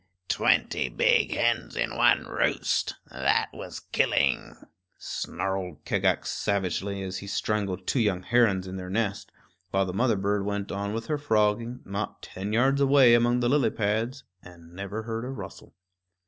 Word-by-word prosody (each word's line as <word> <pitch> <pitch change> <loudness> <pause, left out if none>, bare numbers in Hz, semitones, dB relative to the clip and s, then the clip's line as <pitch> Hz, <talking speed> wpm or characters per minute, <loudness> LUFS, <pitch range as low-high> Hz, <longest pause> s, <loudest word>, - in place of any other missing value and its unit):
"Twenty - - +2
big - - +3
hens - - 0
in - - -1
one - - +4
roost - - 0 0.2
that - - +1
was - - -8
killing," - - +1 0.4
snarled 95 -5 -4
Kagax - - +1
savagely, 100 0 -1
as 95 0 -4
he 100 - -9
strangled 100 -1 -2
two 130 - +1
young 100 -5 +1
herons 110 -6 +3
in 95 0 -6
their 90 -1 -6
nest, 100 0 -2 0.4
while 95 0 +1
the 90 - -4
mother 115 +3 +2
bird 100 +1 0
went 100 0 -3
on 100 +1 -3
with 115 - -4
her 150 -2 -1
frogging, 115 -1 +1
not 100 +2 -5
ten 95 +3 -6
yards 135 +5 +3
away 135 -3 +6
among 120 +1 +3
the 120 - +2
lily 145 +1 +3
pads, 115 +5 -1 0.2
and 85 -1 -15
never 100 +4 -5
heard 115 0 -4
a 125 - -5
rustle. 135 - -9
105 Hz, 160 wpm, -27 LUFS, 95-120 Hz, 0.4 s, away